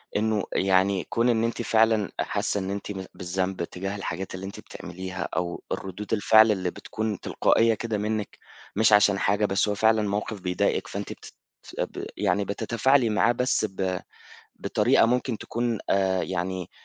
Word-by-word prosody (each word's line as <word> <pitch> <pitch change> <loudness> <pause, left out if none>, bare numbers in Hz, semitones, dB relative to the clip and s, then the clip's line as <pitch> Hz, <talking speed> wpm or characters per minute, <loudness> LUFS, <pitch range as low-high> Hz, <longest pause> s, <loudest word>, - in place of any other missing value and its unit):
إنه 105 -1 +1
يعني 95 -1 +2
كون 120 +1 +2
إن 115 -1 +2
أنتِ 115 +1 -1
فعلًا 110 -2 +2
حاسة 100 - -1
إن 95 0 -4
أنتِ 100 +1 -4
ب 95 -2 -6
بالذنب 95 0 -2
تجاه 95 +4 -5
الحاجات 95 -1 -5
اللي 95 +1 -6
أنتِ 100 - -8
بتعمليها 95 0 -6
أو 85 +1 -2
الردود 95 +3 -4
الفعل 110 +1 +6
اللي 95 -3 -1
بتكون 110 -3 -4
تلقائية 115 0 +2
كده 110 0 -3
منِك، 105 0 -3 0.4
مش 110 -1 +4
عشان 100 -1 +5
حاجة، 105 +2 +2
بس 95 +1 +1
هو 105 - 0
فعلًا 110 +1 +3
موقف 105 0 -3
بيضايقك 90 -1 0
فأنتِ - - -5
بت - - -14 0.5
ب - - -3
يعني 100 -1 +1
بتتفاعلي 115 +4 +2
معاه 110 +2 +3
بس 125 -2 +1
ب 95 -2 -2 0.6
بطريقة - - +3
ممكن 125 -1 0
تكون 120 0 -2
آآ 95 -1 +2
يعني 95 0 -3
100 Hz, 160 wpm, -26 LUFS, 95-110 Hz, 0.6 s, الفعل